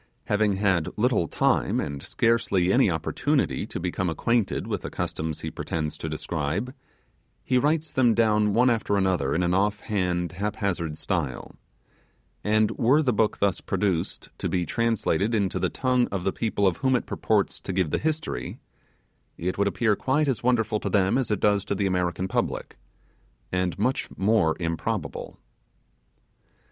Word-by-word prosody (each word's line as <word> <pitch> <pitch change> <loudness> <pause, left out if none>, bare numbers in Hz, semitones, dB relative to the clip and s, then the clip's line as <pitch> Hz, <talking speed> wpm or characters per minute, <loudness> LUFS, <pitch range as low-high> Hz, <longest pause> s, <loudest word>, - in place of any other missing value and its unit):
Having 105 0 +2
had 95 -5 +1
little 110 -6 +2
time, - - +1
and 70 -2 -4
scarcely 100 -5 +1
any - - +4
opportunity, - - 0
to - - -5
become 90 +1 -1
acquainted 115 +7 0
with - - -3
the - - -5
customs 80 -1 -3
he - - -4
pretends 75 -2 -3
to 80 - -4
describe, 80 - -3 0.7
he 125 - +2
writes 155 +3 0
them 120 -4 +3
down 105 -2 +3
one 125 +2 +5
after 110 -3 0
another 90 -8 +1
in 90 - +1
an 85 0 +1
off 105 +2 +1
hand, 90 -5 -1
haphazard 95 -5 -2
style; 80 -11 -3 0.9
and 110 0 +2
were 135 +6 +4
the 125 -4 +2
book 105 0 +1
thus 100 -4 +1
produced 95 -6 -2
to - - -2
be 90 -2 0
translated 115 -2 0
into 100 -4 0
the - - +1
tongue 125 -1 +1
of 95 -3 -4
the 95 - 0
people 110 -3 0
of 95 -3 +2
whom 130 -1 +2
it 125 - -1
purports 105 -3 0
to - - -5
give 90 -4 0
the - - +1
history, 155 - -3 0.8
it 90 +2 -2
would 100 - +3
appear 110 +1 +2
quite 145 +7 +1
as 130 -4 0
wonderful 115 -4 +1
to - - -3
them 95 -2 +2
as 130 -3 0
it 105 -3 0
does 100 -2 +2
to 100 - -2
the 100 - 0
American 90 0 0
public, - - -2 0.8
and 90 -1 -1
much 125 +6 0
more 95 -5 +3
improbable. 85 -2 -3
100 Hz, 165 wpm, -26 LUFS, 90-115 Hz, 0.9 s, one